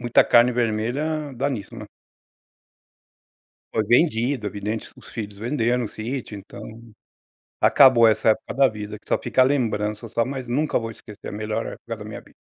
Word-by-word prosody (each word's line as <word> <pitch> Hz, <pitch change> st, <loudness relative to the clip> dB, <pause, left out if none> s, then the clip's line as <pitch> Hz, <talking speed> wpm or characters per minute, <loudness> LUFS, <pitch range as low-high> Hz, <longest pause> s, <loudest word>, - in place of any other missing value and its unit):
muita 120 Hz, -1 st, +4 dB
carne 120 Hz, +1 st, +5 dB
vermelha 125 Hz, +6 st, -1 dB
dá 140 Hz, +3 st, 0 dB
nisso, 105 Hz, -7 st, -6 dB
né? -, -, -7 dB, 1.9 s
Foi 110 Hz, -, +1 dB
vendido, 120 Hz, -3 st, +2 dB
evidente, 105 Hz, +2 st, -4 dB
os -, -, -15 dB
filhos 105 Hz, -3 st, -7 dB
venderam 120 Hz, +1 st, 0 dB
o -, -, -4 dB
sítio 115 Hz, -1 st, -5 dB
então, 100 Hz, -, -11 dB, 1.0 s
acabou 130 Hz, -4 st, +6 dB
essa 110 Hz, 0 st, +4 dB
época 110 Hz, -, -2 dB
da 135 Hz, 0 st, +5 dB
vida, 105 Hz, -1 st, -7 dB
que -, -, -27 dB
só -, -, +2 dB
fica 125 Hz, +1 st, +2 dB
a -, -, +6 dB
lembrança, 115 Hz, -5 st, -1 dB
só, 115 Hz, +2 st, 0 dB
mas 130 Hz, -1 st, -5 dB
nunca 145 Hz, +6 st, 0 dB
vou 115 Hz, -1 st, -5 dB
esquecer 105 Hz, -2 st, -11 dB
a -, -, -6 dB
melhor 110 Hz, +2 st, -3 dB
época 115 Hz, -1 st, -7 dB
da 105 Hz, -, -10 dB
minha 105 Hz, -, -7 dB
vi -, -, -22 dB
115 Hz, 175 wpm, -23 LUFS, 105-130 Hz, 1.9 s, acabou